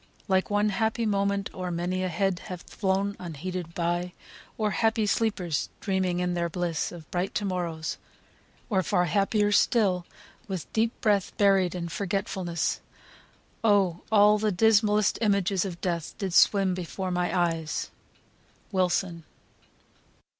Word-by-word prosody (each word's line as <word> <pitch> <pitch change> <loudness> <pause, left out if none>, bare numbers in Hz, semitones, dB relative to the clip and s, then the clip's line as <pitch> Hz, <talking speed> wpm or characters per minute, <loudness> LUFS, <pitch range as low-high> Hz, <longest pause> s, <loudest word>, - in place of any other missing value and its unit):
like 190 -1 +2
one 205 +1 +2
happy 220 +3 0
moment 200 -1 0
O'er 185 -1 -4
many 175 +2 -2
a 185 - -1
head 180 +1 0
hath 180 -2 -8
flown 195 0 0
unheeded 175 +1 -6
by; 175 +1 -1 0.5
O'er 215 -1 +1
happy 225 +1 +1
sleepers 200 -8 0
dreaming 190 -3 0
in 180 0 0
their 170 -1 -1
bliss 170 -2 -2
Of 170 -3 -11
bright 180 +2 -2
to 205 - 0
morrows 170 -4 -3 0.7
or 195 -5 +2
far 180 +1 +1
happier 205 +3 +2
still, 195 -4 +2 0.4
With 190 -5 -5
deep 225 +1 0
breath 205 -3 +1
buried 195 -3 +3
in 170 -1 -3
forgetfulness. 185 -2 -2 0.8
O 195 -6 +3
all 210 0 +6
the 215 0 +1
dismallest 210 +1 +3
images 200 -3 +2
of 175 -3 -6
death 170 -3 -3
Did 195 -4 -3
swim 195 0 +5
before 185 +1 -4
my 180 0 0
eyes!" 165 -3 -1 0.8
WILSON. 180 -2 0
190 Hz, 135 wpm, -27 LUFS, 175-205 Hz, 0.8 s, all